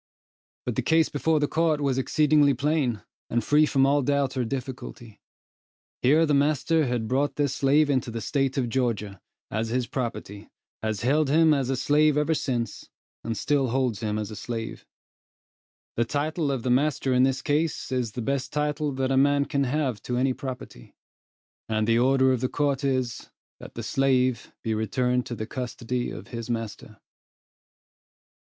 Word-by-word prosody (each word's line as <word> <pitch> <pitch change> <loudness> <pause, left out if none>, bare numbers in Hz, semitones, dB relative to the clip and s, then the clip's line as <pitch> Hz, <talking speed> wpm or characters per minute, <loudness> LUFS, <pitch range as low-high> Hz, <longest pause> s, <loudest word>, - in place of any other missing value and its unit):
But - - -2
the - - +2
case 160 0 +3
before 155 +1 +1
the 145 - +1
court 160 -1 +1
was 135 -2 0
exceedingly 150 0 +3
plain 135 -5 0 0.3
and 120 -1 0
free 150 +5 +4
from 135 -3 +3
all 145 +1 +3
doubt 140 0 0
or 130 - 0
difficulty. 120 -3 -6 0.8
Here 150 +6 +4
the 150 - +1
master 150 +2 +2
has 120 -1 -1
brought 130 +6 0
this 145 -3 0
slave 145 +2 +3
into 130 -4 0
the 115 0 -4
State 135 +3 -1
of 130 -3 +1
Georgia, 110 -6 -2 0.3
as 110 +1 -2
his 125 +1 0
property, 115 -5 -5 0.3
has 110 -2 -2
held 145 +4 +2
him 160 +1 +5
as 135 -3 0
a 135 - +1
slave 150 +3 +3
ever 150 +2 +2
since, 120 -7 -3 0.3
and 115 -1 -3
still 140 -3 +1
holds 125 -3 0
him 105 -2 -2
as 105 0 -4
a - - -6
slave. 115 +2 -6 1.1
The 115 - +2
title 150 +4 -1
of 130 -4 -3
the 125 - 0
master 135 0 +1
in 125 - +4
this 130 0 +1
case 150 0 -1
is 125 -4 -1
the 120 - -4
best 135 +1 -2
title 150 0 -1
that 130 0 -1
a 135 - +2
man 140 +1 +3
can 140 -1 0
have 130 -4 -1
to 125 - -3
any 130 +1 +2
property; 125 - -8 0.7
and 110 -1 +1
the 115 +1 +3
order 130 +1 +4
of 125 - -2
the 130 - 0
court 145 -1 0
is, 130 -3 -1 0.3
that - - -11
the - - -5
slave 130 -3 +1
be 110 - -1
returned 125 +3 0
to 120 - -4
the 110 - -4
custody 125 0 -4
of - - -9
his 115 -1 -6
master. 115 -2 -5
130 Hz, 175 wpm, -26 LUFS, 120-145 Hz, 1.1 s, him